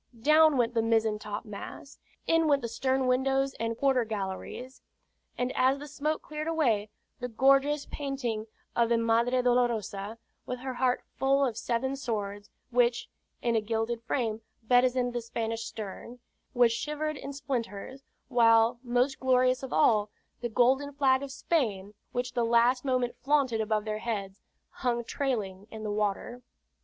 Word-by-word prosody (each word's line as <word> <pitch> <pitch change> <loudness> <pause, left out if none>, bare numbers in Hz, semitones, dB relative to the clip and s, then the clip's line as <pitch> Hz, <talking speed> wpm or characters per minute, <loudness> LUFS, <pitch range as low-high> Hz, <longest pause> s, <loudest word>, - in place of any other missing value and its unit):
Down 305 +3 +5
went 240 -1 +2
the 230 - +2
mizzen 225 -1 +1
topmast, 210 +6 -8 0.3
in 330 -1 +3
went 280 -3 +3
the - - -1
stern 260 +2 0
windows 270 +2 +1
and 230 0 -2
quarter 265 -2 +3
galleries; 215 +4 -5 0.6
and 250 +1 -1
as 260 +2 +3
the 290 +1 -8
smoke 300 +2 -2
cleared 305 +1 -5
away, 240 -11 +1 0.3
the 245 - -3
gorgeous 275 +4 +3
painting 250 -6 -3 0.3
of 235 -1 +3
the 235 - +3
Madre 235 +2 +2
Dolorosa, 225 -4 0 0.3
with 250 - -3
her 260 0 -4
heart 250 0 +1
full 275 +1 +3
of 240 -4 -2
seven 255 +5 -1
swords, 205 -6 -4 0.2
which, 240 0 +2 0.3
in 235 -1 +1
a 220 - +3
gilded 225 +2 -2
frame, 225 -2 -2 0.2
bedizened 245 +1 +3
the 240 - -2
Spanish 230 0 -3
stern, 225 +2 -7 0.4
was 240 -1 +5
shivered 300 +5 -2
in 280 0 -7
splinters; 260 -3 -4 0.3
while, 230 -1 +4
most 250 +2 +1
glorious 255 0 +3
of 265 - -6
all, 210 -2 +3 0.3
the 240 - -2
golden 265 +5 +2
flag 270 -2 +3
of 280 -1 -6
Spain, 215 - -1 0.2
which 245 +1 -3
the 240 -1 +1
last 235 +2 +3
moment 255 -3 0
flaunted 270 -5 +1
above 215 -1 0
their 215 0 -2
heads, 200 -4 -4 0.3
hung 240 -2 -1
trailing 215 -8 -3
in 220 -1 -8
the 210 - -2
water. 210 +4 -2
245 Hz, 155 wpm, -29 LUFS, 225-270 Hz, 0.6 s, Down